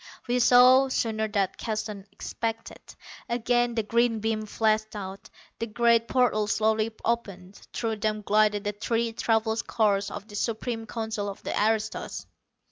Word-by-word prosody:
We 245 +1 +1
saw, 250 +2 +6
sooner 220 -4 -1
than 200 -3 0
Keston 215 -3 -4
expected. 225 -1 -5 0.5
Again 240 0 +1
the 225 - 0
green 235 +1 +1
beam 215 0 -2
flashed 215 0 0
out. 195 -1 -7 0.3
The 230 - -2
great 230 +1 +3
portals 215 -6 +2
slowly 220 0 +1
opened. 200 -5 -3
Through 225 -2 -2
them 215 0 -2
glided 210 0 +2
the 205 - -1
three 230 +2 -1
travel 225 -1 +1
cars 210 -3 +1
of 205 0 -8
the 205 - -11
Supreme 225 +1 -3
Council 220 -2 -3
of 195 - -9
the - - -3
aristos. 220 +1 -1
220 Hz, 145 wpm, -27 LUFS, 210-230 Hz, 0.5 s, saw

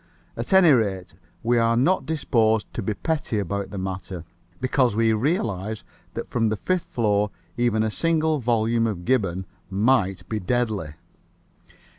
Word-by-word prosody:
At - - -5
any 190 -4 +7
rate, 100 -8 +1 0.3
we 120 +1 +3
are 115 0 +3
not 140 +2 +2
disposed 115 -9 +1
to - - -3
be 105 +2 -2
petty 150 - -2
about 100 0 -2
the 100 - -7
matter, 95 -2 -5 0.4
because 130 -3 +2
we 115 0 +3
realize 110 - -1 0.3
that - - -4
from 115 -2 +1
the 110 - -1
fifth 185 - -1
floor 105 -3 +1 0.3
even 120 -3 +1
a 110 - 0
single 160 +1 +1
volume 115 -1 +1
of 90 -5 -4
Gibbon 95 -8 +1 0.2
might 100 -1 +1
be 110 - -2
deadly. 105 -7 -1
110 Hz, 150 wpm, -24 LUFS, 100-125 Hz, 0.4 s, any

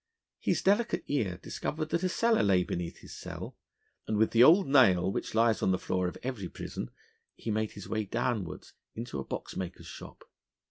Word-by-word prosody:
His - - 0
delicate 205 +5 +2
ear 110 -11 -1
discovered 155 0 -3
that 170 +1 0
a 185 - +2
cellar 230 +4 +3
lay 95 -3 +4
beneath 85 -1 -4
his - - -10
cell; - - -7 0.5
and 110 - 0
with 110 +1 +3
the 115 +1 +6
old 170 +7 +7
nail 95 -10 +5
which - - -4
lies 115 -1 +3
on - - +2
the 95 - +3
floor 90 0 -1
of 90 - -5
every 115 -8 -4
prison - - -6 0.5
he 115 - -4
made 110 0 -1
his 100 - -9
way 110 -1 -1
downwards 100 -4 -2 0.2
into 115 - -5
a - - -3
boxmaker's 90 +5 -6
shop. - - -10
110 Hz, 185 wpm, -30 LUFS, 95-140 Hz, 0.5 s, old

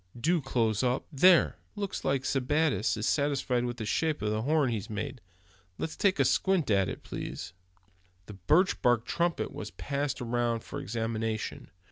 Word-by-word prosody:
Do 165 +6 +2
close 115 -5 0
up. 125 0 0
There, 175 +5 +5 0.2
looks 200 -2 -4
like 135 -1 +1
Sebattis 135 -5 +1
is 110 - -2
satisfied 135 -4 +1
with 120 0 -4
the 110 - -4
shape 155 +3 0
of 105 - 0
the 110 0 -1
horn 145 0 +2
he's 110 -2 -4
made. 110 +4 -5 0.6
Let's 160 - -4
take 195 -2 +2
a - - +4
squint 185 - +2
at 95 -3 +3
it, - - -7
please." 85 - -6 0.7
The 105 - -9
birch 155 - +2
bark 120 -1 +3
trumpet 170 +4 -1
was - - -6
passed 140 0 -3
around 120 -1 -1
for - - -6
examination. 115 0 -3
125 Hz, 165 wpm, -29 LUFS, 110-150 Hz, 0.7 s, There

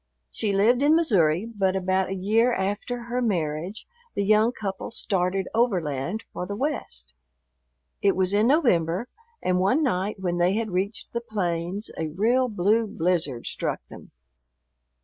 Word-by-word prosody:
She 210 - -1
lived 220 +6 +3
in 295 +2 +5
Missouri, 190 - +3
but 195 -5 0
about 190 0 +1
a 195 - -2
year 220 +6 +2
after 205 +5 -2
her 240 +1 -2
marriage 175 -2 -2 0.3
the 200 - +1
young 215 +3 +4
couple 195 -5 -5
started 190 -3 -1
overland 185 - 0
for 180 - -4
the 200 - -4
West. 135 - -3 0.9
It 200 -1 +3
was 185 +1 +1
in 210 +3 +4
November, 230 - +2 0.3
and 180 0 +2
one 225 +12 +3
night 205 -5 -1
when 175 -2 -1
they 175 +2 +3
had 220 0 -1
reached 195 +4 -2
the 235 - -1
plains 190 -2 -3
a 160 - -1
real 230 +11 +2
blue 215 +2 +2
blizzard 165 - -1
struck - - -3
them. - - -12
195 Hz, 150 wpm, -25 LUFS, 180-230 Hz, 0.9 s, in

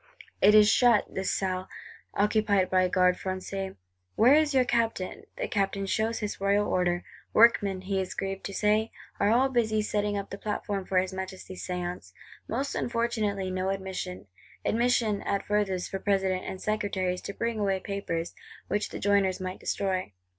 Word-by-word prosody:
It 210 +2 +7
is 210 -1 +8
shut, 235 -1 +4
this 190 0 -1
Salle; 185 -1 -1 0.5
occupied 205 -2 +2
by 185 -1 +4
Gardes 180 0 +3
Françaises. 190 +1 -4 0.4
'Where 245 +5 +6
is 305 0 +4
your 260 -3 +3
Captain?' 230 -6 -1
The - - -2
Captain 195 -1 -1
shows 220 +4 -1
his 205 -2 -4
royal 200 +1 +2
order: 175 -1 +1 0.3
workmen, 205 -4 +4
he 190 0 -1
is 185 - -5
grieved 195 0 -4
to 200 - -5
say, 215 +1 +2 0.3
are 200 - +3
all 245 +4 +4
busy 220 -4 +1
setting 205 -1 -1
up 200 0 -5
the 195 - -6
platform 205 -2 -3
for 185 - 0
his 185 +1 +1
Majesty's 190 0 -6
Séance; 180 - -4 0.3
most 270 +5 -2
unfortunately, 220 -5 -1
no 185 +1 -1
admission; 190 - -4 0.4
admission, 230 -3 +2
at 200 0 -2
furthest, 205 -3 0
for 195 - -3
President 190 -2 0
and 190 - -5
Secretaries 190 -4 -1
to 200 - -6
bring 230 -1 -2
away 195 -2 +1
papers, 185 -4 -3 0.4
which 205 0 0
the - - -6
joiners 200 -2 +2
might 185 0 -5
destroy! 185 - -2
200 Hz, 165 wpm, -28 LUFS, 185-215 Hz, 0.5 s, is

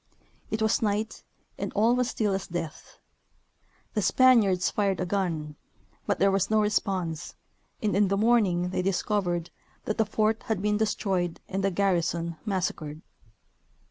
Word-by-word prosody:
It 220 0 -1
was 220 - +2
night, 215 0 -1 0.4
and - - -3
all 225 +4 +3
was 250 -1 +1
still 210 -5 0
as 195 0 -3
death; 165 -3 -6 1.0
the 215 - 0
Spaniards 205 -4 +4
fired 195 -3 0
a 185 - 0
gun, 165 -6 -2 0.5
but - - +1
there 195 0 +3
was 195 0 +1
no 220 0 +3
response, 190 -6 -1 0.5
and 210 -2 +1
in 200 0 +4
the 195 +1 0
morning 200 -6 +3
they 185 - 0
discovered 180 -2 -1 0.3
thrift 215 - -2
the 220 - +4
fort 215 +1 +1
had 220 -4 0
been 210 +1 +1
destroyed 195 -5 -1
and 195 0 -3
the 195 - +3
garrison 170 -3 0
massacred. 170 -6 -3
195 Hz, 150 wpm, -27 LUFS, 175-215 Hz, 1.0 s, Spaniards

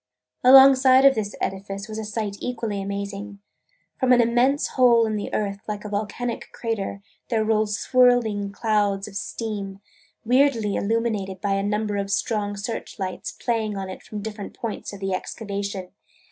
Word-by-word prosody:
Alongside 265 0 +8
of 275 - +8
this 215 -3 -3
edifice 195 +1 -4
was 220 0 -6
a - - -4
sight 210 -1 -3
equally 230 -5 -3
amazing. 200 +1 -5 0.6
From 260 -2 +2
an 250 - +6
immense 245 +4 +2
hole 240 -3 +5
in 215 -1 -1
the 205 - -4
earth 200 -1 -2
like 210 0 -5
a - - -4
volcanic 215 +4 -3
crater, 205 -3 -4 0.3
there 220 -3 +1
rose 215 -1 +1
swirling 240 -6 +3
clouds 205 -2 0
of 205 - -11
steam, 200 -3 -4 0.5
weirdly 245 -4 +3
illuminated 210 -3 -1
by 200 0 0
a 195 - +1
number 210 0 -1
of 200 0 -2
strong 205 0 -1
search 225 +3 -5
lights 185 -3 -4
playing 220 -4 -2
on 190 -1 -4
it - - -9
from 210 -1 -7
different 210 -2 -7
points 230 -3 -5
of 200 - -9
the 195 -1 -1
excavation. 200 -1 -4
210 Hz, 160 wpm, -24 LUFS, 200-230 Hz, 0.6 s, Alongside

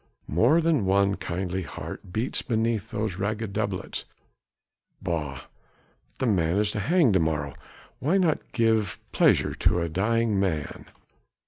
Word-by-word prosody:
More 120 - +4
than 160 -10 +2
one 100 +1 +3
kindly 95 0 -3
heart 85 +2 -8
beats 110 +7 -1
beneath 110 -2 -1
these 105 -3 -3
ragged 105 +1 -2
doublets. - - -3 0.9
Bah! 80 -7 -3 0.8
the - - -1
man 90 -5 +2
is 105 0 +2
to 105 - -3
hang 155 - +3
to 95 - +4
morrow, 75 -3 -1 0.5
why 160 +9 +2
not 170 -5 0
give 110 -4 +1
pleasure - - +3
to 90 - +2
a 85 -1 -1
dying 105 +4 +1
man? 80 -7 -2
100 Hz, 135 wpm, -26 LUFS, 90-115 Hz, 0.9 s, More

